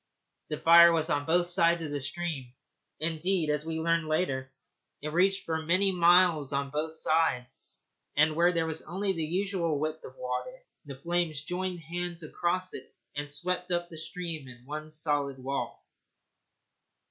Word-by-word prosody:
The 150 - -2
fire 170 +2 +8
was 160 -1 0
on 145 0 0
both 175 +2 +3
sides 170 -1 +2
of 150 - -5
the 145 - -2
stream 145 -3 -4 0.5
indeed, 165 +1 0
as 150 +1 -2
we 160 0 -2
learned 165 0 +1
later, 135 -5 -1 0.5
it 150 - -4
reached 195 +3 +2
for 160 -1 -1
many 185 +5 +3
miles 175 -4 +4
on 140 0 -1
both 155 +2 -2
sides, 155 -6 +1 0.3
and 155 +1 +4
where 175 +2 +4
there 165 -2 0
was 160 0 -4
only 190 +4 -2
the 165 -3 -2
usual 175 -1 0
width 155 +2 -3
of 130 - -10
water 125 - -4 0.3
the 140 -2 -7
flames 170 -1 -1
joined 180 +1 -3
hands 175 +1 -4
across 180 +4 -1
it 130 - -10 0.2
and 145 0 -4
swept 180 +5 -1
up 175 -1 -1
the 165 - -10
stream 160 -3 -5
in 120 -1 -13
one 155 +2 -6
solid 145 -3 0
wall. 135 +2 -4
160 Hz, 165 wpm, -29 LUFS, 150-175 Hz, 0.5 s, fire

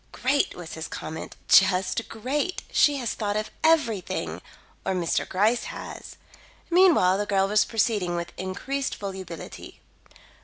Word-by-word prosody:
"Great!" 275 +3 +1
was 175 -2 -8
his 160 - -5
comment. 160 - -7
"Just 190 +3 +4
great! 285 - -2
She 290 - +4
has 245 -4 -2
thought 205 -1 -2
of 215 0 -3
everything 270 - +1 0.4
or - - -1
Mr. 175 -2 0
Gryce 215 +6 +2
has." - - -8 0.6
Meanwhile, 335 - +5
the 205 - -2
girl 195 -1 +2
was 210 +1 +3
proceeding 205 -6 0
with 170 0 -4
increased 260 +9 -3
volubility. 190 -4 -8
205 Hz, 130 wpm, -26 LUFS, 185-255 Hz, 0.6 s, Meanwhile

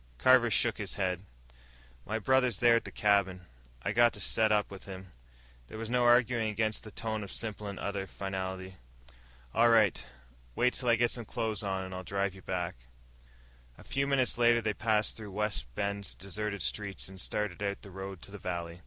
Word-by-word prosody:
Carver 125 - +6
shook 115 +1 +2
his 100 -3 -2
head. 90 -3 -1 0.9
"My 110 - -1
brother's 125 -1 +3
there 120 +1 +5
at - - -3
the - - -7
cabin. 100 -3 +2 0.4
I - - 0
got 120 -1 +5
to - - -7
set 110 +3 +3
up 105 -1 +2
with 95 - -9
him." 95 -1 -9 0.6
There - - -9
was 115 +1 -5
no 125 -1 +3
arguing 120 -2 +4
against 110 0 -1
that 105 - -11
tone 110 -1 -2
of 100 - -7
simple 105 -2 -3
and 100 -1 -6
utter 100 -1 -3
finality. 95 -1 -5 0.8
"All 120 +1 +5
right. 110 - +4 0.5
Wait 125 0 +3
till 125 - -1
I 115 - +6
get 120 +1 +2
some 120 -2 -3
clothes 110 0 -2
on, 95 -2 -2
and 95 0 -7
I'll 90 - -4
drive 100 +1 -1
you 95 - -13
back." 90 -6 -3 1.0
A - - -14
few 140 0 -1
minutes 130 -3 +1
later 120 0 +5
they 110 -2 -1
passed 110 -1 +1
through 110 -2 -7
Wide 105 0 0 0.2
Bend's 100 0 -2
deserted 100 0 -3
streets 100 +1 -2
and 95 -1 -8
started 105 0 -2
out 100 -1 -2
the 100 - -11
road 95 -1 -7
to - - -7
the 105 - -8
valley. 85 -2 -4
105 Hz, 195 wpm, -31 LUFS, 95-115 Hz, 1.0 s, Carver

